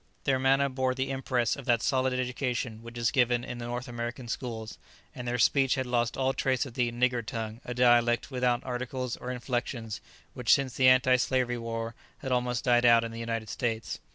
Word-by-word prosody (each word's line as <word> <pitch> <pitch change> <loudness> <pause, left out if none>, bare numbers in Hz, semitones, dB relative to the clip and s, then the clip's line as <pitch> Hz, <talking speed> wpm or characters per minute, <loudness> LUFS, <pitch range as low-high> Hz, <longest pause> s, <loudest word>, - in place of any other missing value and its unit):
Their 130 -2 +2
manner 135 +1 +3
bore 130 -1 -1
the 135 +1 -2
impress 130 -3 0
of 140 - -9
that 120 -1 +2
solid 130 -1 +1
education 125 -3 -2
which 115 +1 -10
is 115 -1 +1
given 120 -2 +2
in 125 -1 -6
the 120 - -5
North 120 +2 -4
American 120 +1 -5
schools, 115 -2 -5 0.3
and 125 -1 -7
their 120 0 0
speech 135 +2 +3
had 130 - -2
lost 120 -1 0
all 135 0 +1
trace 130 +1 0
of 130 - -9
the 120 -1 0
"nigger 125 0 +1
tongue," 110 0 -5
a 125 - -5
dialect 120 +1 +3
without 125 -2 +1
articles 125 0 -3
or 125 - -7
inflexions, 120 -3 -3 0.3
which 125 -3 0
since 135 -3 +3
the 130 -1 +5
anti 130 0 +5
slavery 125 -1 0
war 115 0 -4 0.2
has 130 - -5
almost 125 -1 0
died 120 -1 +4
out 115 -1 +6
in 115 - -4
the 115 - -7
United 115 -1 -3
States. 115 -1 -3
125 Hz, 205 wpm, -29 LUFS, 120-130 Hz, 0.3 s, out